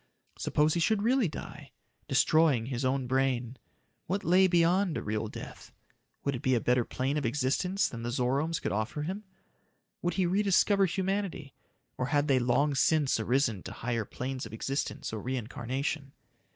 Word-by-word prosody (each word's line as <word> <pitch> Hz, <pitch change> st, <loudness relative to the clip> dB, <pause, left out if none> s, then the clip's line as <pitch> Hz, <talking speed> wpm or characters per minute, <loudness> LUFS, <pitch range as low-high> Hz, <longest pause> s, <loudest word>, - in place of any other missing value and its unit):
Suppose 150 Hz, +1 st, +2 dB
he 170 Hz, -, 0 dB
should 205 Hz, +4 st, +2 dB
really 245 Hz, -1 st, +3 dB
die 155 Hz, -, -9 dB, 0.3 s
destroying 155 Hz, -8 st, +3 dB
his 125 Hz, 0 st, -3 dB
own 130 Hz, 0 st, 0 dB
brain? 130 Hz, -1 st, 0 dB, 0.5 s
What 195 Hz, +4 st, -1 dB
lay 185 Hz, +3 st, +5 dB
beyond 175 Hz, 0 st, +2 dB
real 110 Hz, +1 st, -2 dB
death? -, -, -9 dB, 0.5 s
Would 140 Hz, -, 0 dB
it 125 Hz, -, -4 dB
be 130 Hz, -3 st, +2 dB
a -, -, +2 dB
better 125 Hz, +1 st, +2 dB
plane 135 Hz, +5 st, -2 dB
of 145 Hz, -, -1 dB
existence 145 Hz, -, +1 dB
than 115 Hz, -, -7 dB
the 120 Hz, -, -3 dB
Zoromes 135 Hz, +6 st, 0 dB
could -, -, -3 dB
offer 110 Hz, +8 st, -2 dB
him? 195 Hz, +6 st, -5 dB, 0.8 s
Would 175 Hz, -, -1 dB
he 190 Hz, -, +2 dB
rediscover 195 Hz, +1 st, +3 dB
humanity, 190 Hz, -6 st, -2 dB, 0.5 s
or 125 Hz, -, 0 dB
had 145 Hz, 0 st, +1 dB
they 135 Hz, -3 st, +4 dB
long 125 Hz, +4 st, +2 dB
since 140 Hz, -1 st, +2 dB
arisen 115 Hz, -3 st, +1 dB
to -, -, -8 dB
higher 120 Hz, -2 st, -2 dB
planes 130 Hz, +2 st, -5 dB
of 110 Hz, -, -13 dB
existence 135 Hz, +1 st, -3 dB
or 110 Hz, -, -4 dB
reincarnation? 130 Hz, +4 st, -3 dB
140 Hz, 165 wpm, -30 LUFS, 125-170 Hz, 0.8 s, lay